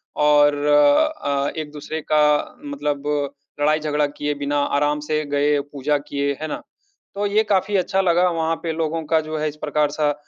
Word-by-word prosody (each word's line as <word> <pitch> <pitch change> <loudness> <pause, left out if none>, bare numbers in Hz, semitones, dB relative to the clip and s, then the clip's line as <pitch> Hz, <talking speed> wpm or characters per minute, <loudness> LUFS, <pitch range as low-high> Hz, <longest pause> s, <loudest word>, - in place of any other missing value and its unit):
और 145 0 +4
अ, 145 - +2
एक-दूसरे 155 +1 -5
का 150 -1 +3
मतलब 150 - -3 0.5
लड़ाई-झगड़ा 150 0 +1
किए 145 0 -3
बिना 145 0 -1 0.2
आराम 150 +1 +1
से 155 +1 -1
गए, 145 0 +1
पूजा 145 +1 -1
किए, 140 0 -2
है 155 - -2
ना? - - -5 0.5
तो 205 +1 -1
ये 215 +2 +2
काफ़ी 200 -1 0
अच्छा 190 +1 +1
लगा, 180 0 +3
वहाँ 165 0 0
पे 165 - -1
लोगों 160 0 -2
का, 160 +1 +2
जो 155 0 -5
है, 155 0 -1
इस 150 - -10
प्रकार-सा, 150 0 0
150 Hz, 165 wpm, -21 LUFS, 145-160 Hz, 0.5 s, और